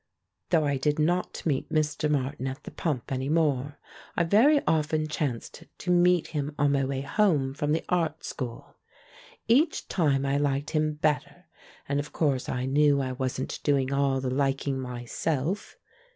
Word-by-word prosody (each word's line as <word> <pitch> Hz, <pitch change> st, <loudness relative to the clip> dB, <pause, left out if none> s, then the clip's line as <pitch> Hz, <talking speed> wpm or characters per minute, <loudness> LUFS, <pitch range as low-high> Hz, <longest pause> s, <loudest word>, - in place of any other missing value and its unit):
Though 160 Hz, -4 st, +3 dB
I 145 Hz, -1 st, +1 dB
did 145 Hz, +2 st, 0 dB
not 175 Hz, +4 st, 0 dB
meet 145 Hz, -5 st, 0 dB
Mr. 155 Hz, 0 st, 0 dB
Martin 135 Hz, -2 st, -1 dB
at 135 Hz, +3 st, -6 dB
the -, -, -8 dB
pump 145 Hz, -8 st, -3 dB
any 130 Hz, +1 st, -2 dB
more, 145 Hz, -3 st, +1 dB, 0.4 s
I 170 Hz, -, +4 dB
very 230 Hz, -, +5 dB
often 155 Hz, 0 st, +1 dB
chanced 150 Hz, +1 st, -4 dB
to 180 Hz, -, -2 dB
meet 175 Hz, -1 st, +4 dB
him 145 Hz, -1 st, -3 dB
on 145 Hz, -1 st, +3 dB
my 140 Hz, -1 st, +2 dB
way 135 Hz, 0 st, -2 dB
home 140 Hz, -3 st, +1 dB
from 145 Hz, +1 st, -1 dB
the 160 Hz, -, 0 dB
art 165 Hz, -3 st, 0 dB
school. 120 Hz, -3 st, -6 dB, 0.7 s
Each 285 Hz, +8 st, +3 dB
time 140 Hz, -6 st, +1 dB
I 140 Hz, +1 st, +1 dB
liked 145 Hz, 0 st, -1 dB
him 155 Hz, -1 st, +1 dB
better, 150 Hz, 0 st, -1 dB, 0.4 s
and 140 Hz, 0 st, 0 dB
of 145 Hz, +1 st, -6 dB
course 140 Hz, -5 st, 0 dB
I 125 Hz, 0 st, -2 dB
knew 145 Hz, +1 st, +3 dB
I 130 Hz, -1 st, -1 dB
wasn't 130 Hz, 0 st, -3 dB
doing 140 Hz, -2 st, +1 dB
all 140 Hz, -1 st, +2 dB
the 130 Hz, -1 st, -2 dB
liking 135 Hz, 0 st, 0 dB
myself. 130 Hz, -, -3 dB
145 Hz, 165 wpm, -27 LUFS, 135-155 Hz, 0.7 s, very